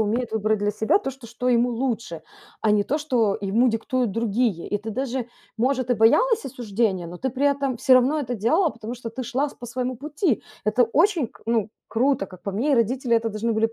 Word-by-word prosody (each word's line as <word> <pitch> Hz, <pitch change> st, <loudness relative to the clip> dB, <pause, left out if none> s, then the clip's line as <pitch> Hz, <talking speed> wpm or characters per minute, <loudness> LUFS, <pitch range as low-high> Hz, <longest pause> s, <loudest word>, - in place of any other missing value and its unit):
умеет 220 Hz, +2 st, 0 dB
выбрать 215 Hz, -1 st, +1 dB
для 205 Hz, 0 st, 0 dB
себя 220 Hz, -, +2 dB
то, 270 Hz, -, -4 dB
что 260 Hz, -3 st, -13 dB
что 240 Hz, +2 st, -3 dB
ему 245 Hz, 0 st, +3 dB
лучше, 230 Hz, -9 st, -3 dB, 0.4 s
а 215 Hz, -2 st, +3 dB
не 210 Hz, -1 st, +3 dB
то, 295 Hz, +9 st, -1 dB
что 240 Hz, -9 st, +1 dB
ему 220 Hz, +6 st, +2 dB
диктуют 240 Hz, +1 st, -1 dB
другие. 225 Hz, -3 st, 0 dB
И 205 Hz, -, 0 dB
ты 220 Hz, +2 st, -6 dB
даже, 255 Hz, 0 st, -3 dB, 0.3 s
может, 255 Hz, +1 st, 0 dB
и 245 Hz, -, +4 dB
боялась 425 Hz, -, +4 dB
осуждения, 220 Hz, -7 st, -1 dB
но 175 Hz, +1 st, -8 dB
ты 260 Hz, +8 st, -2 dB
при 275 Hz, +3 st, 0 dB
этом 280 Hz, -3 st, 0 dB
всё 255 Hz, +2 st, +4 dB
равно 260 Hz, +5 st, +4 dB
это 250 Hz, -4 st, -3 dB
делала, 310 Hz, -, +2 dB
потому 230 Hz, +1 st, -7 dB
что 235 Hz, -1 st, -7 dB
ты 255 Hz, +3 st, -5 dB
шла 265 Hz, +4 st, -1 dB
с -, -, -14 dB
по 240 Hz, -, -10 dB
своему 250 Hz, +2 st, -3 dB
пути. 300 Hz, -, -1 dB, 0.2 s
Это 215 Hz, +4 st, +3 dB
очень 310 Hz, -, +2 dB
к -, -, -21 dB
ну, 225 Hz, -2 st, +1 dB, 0.2 s
круто, 250 Hz, -2 st, +1 dB
как 185 Hz, -2 st, -14 dB
по 200 Hz, -, -3 dB
мне, 240 Hz, +10 st, 0 dB
и -, -, +6 dB
родители 240 Hz, +1 st, +1 dB
это 225 Hz, 0 st, +2 dB
должны 220 Hz, +2 st, -2 dB
были, 225 Hz, +1 st, +1 dB
235 Hz, 225 wpm, -24 LUFS, 220-260 Hz, 0.4 s, и